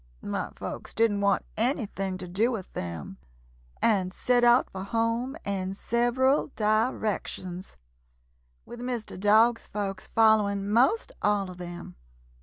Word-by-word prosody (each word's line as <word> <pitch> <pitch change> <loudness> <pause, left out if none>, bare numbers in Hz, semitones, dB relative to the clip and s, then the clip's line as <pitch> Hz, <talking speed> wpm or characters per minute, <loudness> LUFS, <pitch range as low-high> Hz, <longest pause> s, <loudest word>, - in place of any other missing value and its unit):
My - - -3
folks - - -7
didn't 220 -3 +2
want 200 0 +2
anything 215 -6 -1
to 185 -1 -7
do 210 +8 +1
with 205 -6 -6
them, 85 +2 -6 0.7
and 190 -5 +2
set 245 +5 +1
out 240 +1 +5
for 190 - -6
home 230 +6 -1
in 195 -1 -2
several 240 +6 +2
directions, 210 -4 -1 0.9
with 240 - -10
Mr. 245 -3 -4
Dog's 220 +4 +4
folks 195 -2 -4
following 210 -3 +3
most 260 - +3
all 205 -2 +1
of 180 - -12
them. 175 - -8
210 Hz, 125 wpm, -27 LUFS, 195-235 Hz, 0.9 s, out